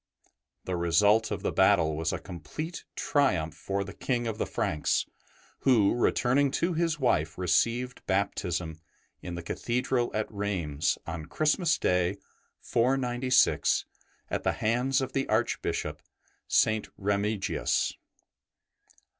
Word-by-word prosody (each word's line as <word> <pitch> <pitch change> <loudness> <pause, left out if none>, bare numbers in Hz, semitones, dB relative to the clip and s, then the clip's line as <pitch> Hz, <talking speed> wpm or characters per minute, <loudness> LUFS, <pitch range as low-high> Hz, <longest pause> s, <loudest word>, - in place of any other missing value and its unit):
'' - - -54
The 90 - -2
result 100 +6 +3
of 100 -3 -4
the - - 0
battle 85 -5 +3
was 80 +1 -1
a - - -2
complete 100 - -7
triumph 90 - +1
for 95 +5 -3
the 95 - -9
King 120 -2 -1
of 110 -2 -3
the - - -1
Franks, 75 - 0 0.5
who, 115 -7 +4
returning 130 +3 +2
to 170 +1 +1
his 165 -1 0
wife, 80 - +1
received 115 +8 0
baptism 90 -4 -1 0.4
in 90 -1 -6
the 85 - -6
Cathedral 120 +6 -1
at 110 0 0
Rheims 95 -8 -1
on 80 -2 -6
Christmas 160 +2 +2
Day, 90 +1 +1 0.4
496, 125 +1 +2 0.5
at - - -1
the - - +1
hands 125 +5 +1
of 130 0 -4
the 135 - -1
Archbishop, 110 +2 -1 0.5
St. 110 -1 +2
Remigius. 100 0 0
105 Hz, 125 wpm, -28 LUFS, 90-125 Hz, 0.5 s, who